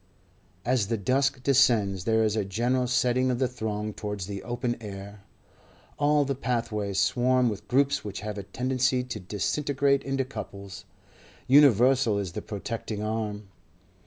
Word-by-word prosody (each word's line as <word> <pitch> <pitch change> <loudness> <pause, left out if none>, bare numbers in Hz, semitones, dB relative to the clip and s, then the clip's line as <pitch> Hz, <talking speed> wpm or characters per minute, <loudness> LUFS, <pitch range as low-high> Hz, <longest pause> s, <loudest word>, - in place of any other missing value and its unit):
As 120 -4 +1
the 115 +1 -1
dusk 130 +5 0
descends 115 -9 +3
there 110 0 +3
is 110 -1 +1
a 110 - +1
general 120 +6 0
setting 125 +1 +2
of 125 - 0
the 130 0 +1
throng 110 -3 -4
towards 105 -3 -5
the 100 0 -6
open 120 +1 -2
air; 100 -1 -8 0.8
all 145 0 +3
the 140 - -1
pathways 115 -6 -2
swarm 125 +4 +3
with 105 -2 -6
groups 140 +2 +2
which 105 - -6
have 105 -1 -5
a 100 0 -9
tendency 130 +2 0
to 125 -4 -6
disintegrate 140 - 0
into 135 -1 -1
couples; 100 -6 -8 0.6
universal 130 -4 +5
is 100 -4 -3
the - - -5
protecting 105 0 -5
arm. 105 -2 -3
115 Hz, 150 wpm, -27 LUFS, 105-130 Hz, 0.8 s, universal